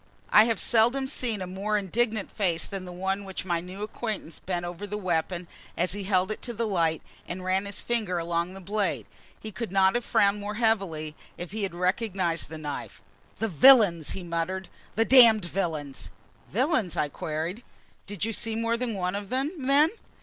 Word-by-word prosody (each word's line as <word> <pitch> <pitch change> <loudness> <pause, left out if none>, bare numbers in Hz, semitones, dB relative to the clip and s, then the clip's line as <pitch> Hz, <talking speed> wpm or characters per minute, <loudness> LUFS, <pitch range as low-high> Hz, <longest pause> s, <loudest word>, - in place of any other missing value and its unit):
I 215 - +8
have 230 -3 0
seldom 240 +4 +3
seen 240 -7 -2
a - - -4
more 195 +4 -1
indignant 215 +2 -1
face 175 -6 0
than 195 -2 -6
the 180 - -8
one 190 +2 -2
which 190 -1 -6
my 175 -2 0
new 185 +3 -7
acquaintance 215 -5 -5
bent 175 -2 -3
over 175 +4 -6
the 210 +1 -4
weapon, 175 -2 -1 0.3
as 175 +2 +1
he 200 -1 -4
held 190 0 +2
it 215 - -5
to 240 - -5
the 230 +1 -1
light, 165 -6 0 0.2
and 180 +1 -5
ran 190 +2 0
his 200 - -5
finger 215 -7 -1
along 170 +2 -2
the 195 - -9
blade. 205 +3 -1 0.3
He 215 - -7
could 230 +1 -5
have 190 -1 +4
not 240 0 0
frowned 200 -1 +2
more 210 +1 -4
heavily 195 -9 0 0.2
if 175 +1 -7
he 215 +1 -4
had 190 -4 -3
recognized 185 -3 0
the 160 - -7
knife. 145 -6 -6 0.4
"The 225 - -1
villains!" 200 - +6
he 190 - -6
muttered. 175 +2 -3 0.3
"The 225 - +3
damned 230 -7 +7
villains!" 150 - -3 0.4
"Villains?" 240 - +1
I 150 - +2
queried. 160 - -4 0.5
"Did 205 0 -3
you 225 - -2
see 225 +1 -1
more 230 +1 0
than 235 -3 -2
one 180 -1 -1
of 200 -1 -5
them, 265 +4 0 0.2
then?" 290 +3 +5
195 Hz, 195 wpm, -27 LUFS, 175-220 Hz, 0.5 s, I